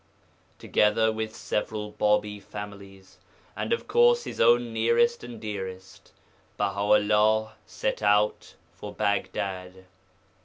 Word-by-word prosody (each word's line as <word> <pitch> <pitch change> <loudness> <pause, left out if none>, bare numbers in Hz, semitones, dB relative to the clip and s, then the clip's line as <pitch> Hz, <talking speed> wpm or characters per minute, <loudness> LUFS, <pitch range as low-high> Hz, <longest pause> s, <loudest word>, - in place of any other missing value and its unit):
Together 110 +1 +2
with 110 0 -4
several 105 0 -3
Bābī 105 -1 0
families, 100 -1 -10 0.4
and, - - -4
of 465 - -1
course, 475 +2 +4
his - - -5
own 120 0 +4
nearest 115 - +2
and 120 -2 -9
dearest, 95 -3 -7 0.5
Baha 100 -1 -1 0.2
'ullah 105 +1 +2
set - - -3
out 105 0 +1 0.2
for - - -9
Baghdad. 95 -2 -3
105 Hz, 110 wpm, -26 LUFS, 100-110 Hz, 0.5 s, course